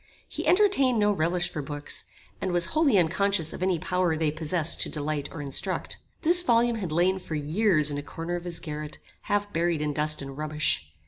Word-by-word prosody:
He - - -4
entertained 360 - +4
no 210 -1 +3
relish 175 0 0
for 150 - -4
books, 145 +1 -5 0.4
and 185 - -1
was 175 -1 +3
wholly 310 -8 +4
unconscious 180 -1 +1
of - - -8
any 185 -1 +2
power 180 -1 0
they 155 -1 +1
possessed 160 +1 0
to - - +3
delight 150 -1 -3
or 150 - -6
instruct. 140 -1 -1 0.3
This 350 +2 +5
volume 235 -5 +3
had 185 -7 -4
lain 180 +4 +2
for 165 -3 -6
years 155 0 +2
in 145 - -2
a - - -4
corner 165 +4 -5
of 175 - -5
his 170 -1 -5
garret, 150 -1 -6 0.3
half 205 0 -1
buried 170 -1 +1
in 150 0 -1
dust 150 +1 +1
and 135 -1 -7
rubbish. 150 - -1
170 Hz, 200 wpm, -27 LUFS, 150-200 Hz, 0.4 s, This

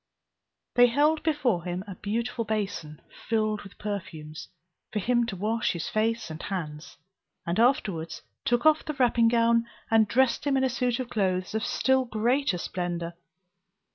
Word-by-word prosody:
They 245 0 +7
held 300 +6 +2
before 270 - +1
him 180 +1 -3
a 200 - -6
beautiful 230 +5 -2
basin, 200 -9 -3 0.3
filled 215 -2 +1
with 200 -1 -13
perfumes, 165 -7 -6 0.4
for - - -3
him 240 +3 +2
to 195 - -4
wash 220 +5 0
his 170 -2 -4
face 220 -3 0
and 160 - -7
hands, 160 -6 -5 0.5
and 170 +4 -1
afterwards 180 -9 +1 0.2
took 240 +3 +1
off 310 0 +5
the 305 - -3
wrapping 240 -3 +3
gown 230 0 +3 0.2
and 220 -1 +5
dressed 260 +5 +2
him 275 -1 +3
in 265 - +2
a 260 - +3
suit 245 0 0
of 255 -2 -4
clothes 185 -2 0
of 220 -1 -1
still 265 +3 +2
greater 240 0 +1
splendour. 175 -1 -3
220 Hz, 160 wpm, -27 LUFS, 185-245 Hz, 0.5 s, They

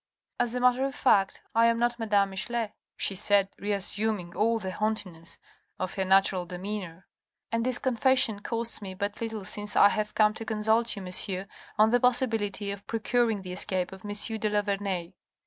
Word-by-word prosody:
"As 245 0 0
a - - 0
matter 250 +1 +3
of 275 0 -2
fact, 195 -9 +2
I 230 +1 +5
am 230 0 +3
not 240 0 0
Madame 205 -3 +2
Michelet," 225 +3 -2 0.2
she - - +1
said, 195 +1 +2
reassuming 200 -2 -2
all 230 +2 +2
the 190 -4 -4
haughtiness 185 -6 -3 0.4
of 185 0 -3
her 190 - -1
natural 190 -1 +3
demeanour, 185 -1 -6 0.5
"and 230 0 +1
this 250 0 +1
confession 255 -3 +2
costs 230 +1 -2
me 190 -2 -6
but 205 +3 -3
little 220 -3 -4
since 205 +2 -3
I 200 - +7
have 210 0 -2
come 215 -1 +4
to 225 - -6
con 220 -1 -3
sult 225 +2 +3
you, 200 - -7
monsieur, 185 +1 -3 0.3
on 215 +1 +5
the 245 - +4
possibility 225 -5 0
of 200 0 -8
procuring 225 -2 +1
the 180 - -7
escape 185 0 -1
of 190 0 -11
M. 205 - -5 0.3
de 215 - 0
la 210 0 +1
Vernaye. 195 -3 -2
210 Hz, 185 wpm, -28 LUFS, 195-230 Hz, 0.5 s, I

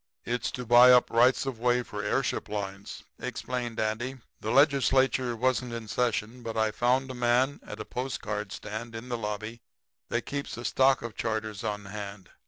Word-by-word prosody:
"'It's 125 +1 -1
to 125 -2 -6
buy 120 +2 +8
up 125 0 +5
rights 125 +4 +4
of 130 -4 -4
way 125 +1 +2
for - - -6
airship - - -1
lines,' 100 -1 -5 0.2
explained 120 -2 -4
Andy. 110 +5 -1 0.2
'The 110 - -4
Legislature 135 -2 +3
wasn't 125 +1 0
in 115 -1 -6
session, 120 +1 -1
but 115 -1 -5
I 110 -1 +2
found 130 +4 +1
a - - -6
man 125 +3 +2
at - - -8
a - - -5
postcard 105 -5 -4
stand 110 +3 -6
in 115 +3 -7
the 120 - -1
lobby 110 +2 -4 0.5
that - - 0
kept 140 -3 -4
a 120 - -6
stock 135 -1 +3
of 115 -2 -6
charters 110 -2 -3
on 105 -2 -3
hand. 100 -2 -8
120 Hz, 180 wpm, -28 LUFS, 110-125 Hz, 0.5 s, buy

